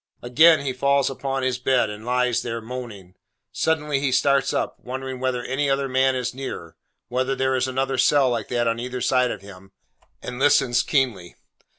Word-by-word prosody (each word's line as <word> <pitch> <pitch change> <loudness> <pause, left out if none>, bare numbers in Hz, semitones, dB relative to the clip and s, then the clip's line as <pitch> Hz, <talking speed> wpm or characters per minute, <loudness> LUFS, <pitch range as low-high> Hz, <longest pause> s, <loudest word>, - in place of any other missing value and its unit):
Again 155 +6 +5
he 130 - -1
falls 140 +1 +1
upon 135 0 -3
his 130 -1 -1
bed, 125 -3 +1
and 105 +1 -9
lies 125 0 +1
there, 115 -1 -4
moaning. 110 -6 -8 0.4
Suddenly 150 -3 0
he 135 -1 0
starts 140 +1 +2
up, 140 - -2
wondering 130 0 -6
whether 130 -1 -1
any 140 +3 -1
other 135 0 0
man 130 0 +2
is 125 -1 -3
near; 125 -11 -7 0.3
whether 130 +2 -1
there 130 0 0
is 130 0 0
another 130 0 -1
cell 135 -1 +4
like 120 - -2
that 120 -1 0
on 115 0 0
either 125 +1 -5
side 125 0 +2
of 105 - -5
him: 95 -1 -14 0.5
and 125 0 -7
listens 125 -4 +3
keenly. 120 - -1
130 Hz, 185 wpm, -23 LUFS, 120-135 Hz, 0.5 s, Again